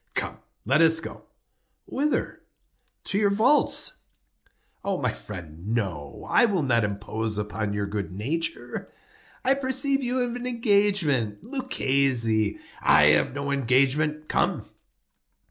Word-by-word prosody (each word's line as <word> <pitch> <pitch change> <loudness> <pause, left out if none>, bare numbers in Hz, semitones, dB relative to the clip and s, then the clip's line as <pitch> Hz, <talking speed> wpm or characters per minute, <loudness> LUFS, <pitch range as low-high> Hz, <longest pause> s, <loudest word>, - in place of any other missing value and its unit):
"Come, - - -3 0.3
let 140 +8 +3
us 165 0 +4
go." - - -9 0.6
"Whither?" 295 +2 -2 0.6
"To 200 - -1
your 205 -2 +3
vaults." 225 +9 +2 0.8
"My 175 - -1
friend, 90 +2 -6
no; 85 -11 -4
I - - +5
will 195 -8 0
not 120 -4 +2
impose 105 +1 -3
upon 105 0 -3
your 105 0 -1
good 100 -1 -4
nature. 130 - -4 0.5
I 265 - +6
perceive 275 +1 0
you 250 0 -1
have 245 -1 -1
an 245 0 -5
engagement. 200 - +1
Luchesi—" 135 - +1 0.2
"I 75 +1 +6
have 75 - +2
no 140 0 -3
engagement;—come." 140 +4 +1
140 Hz, 115 wpm, -25 LUFS, -, 0.8 s, I